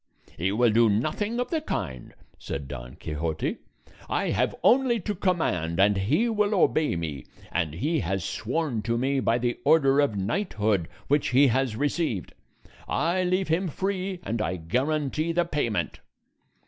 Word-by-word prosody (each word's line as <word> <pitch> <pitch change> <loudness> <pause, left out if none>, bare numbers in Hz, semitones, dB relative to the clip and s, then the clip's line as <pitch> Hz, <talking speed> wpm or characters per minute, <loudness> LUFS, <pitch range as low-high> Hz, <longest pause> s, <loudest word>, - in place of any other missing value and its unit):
"He 90 +4 0
will 115 +2 +3
do 115 +1 +5
nothing 155 - 0
of 245 - -2
the 320 -2 0
kind," 65 - -5 0.2
said 70 -1 -5
Don 60 -2 -8
Quixote; 80 0 -3 0.5
"I - - 0
have - - +1
only 250 -2 +4
to 210 - -2
command 165 - 0
and 100 +1 +5
he 130 - +2
will 210 -2 +1
obey 155 - +2
me, 75 -6 -4 0.3
and 80 -3 -1
he 155 - 0
has 95 +1 -2
sworn 130 0 -2
to 115 +2 -1
me 135 +3 +1
by 115 -2 +2
the 120 0 -1
order 140 -3 +4
of 140 -8 +2
knighthood 105 - 0 0.2
which 145 0 +2
he 135 +3 +5
has 130 -2 0
received. 145 - -1 0.5
I 175 +3 +1
leave 185 0 0
him 175 +4 +1
free, 190 +2 -2
and 115 -1 -2
I 95 - -1
guarantee 145 - -1
the 175 0 +2
payment." 145 -10 -2
130 Hz, 160 wpm, -26 LUFS, -, 0.5 s, do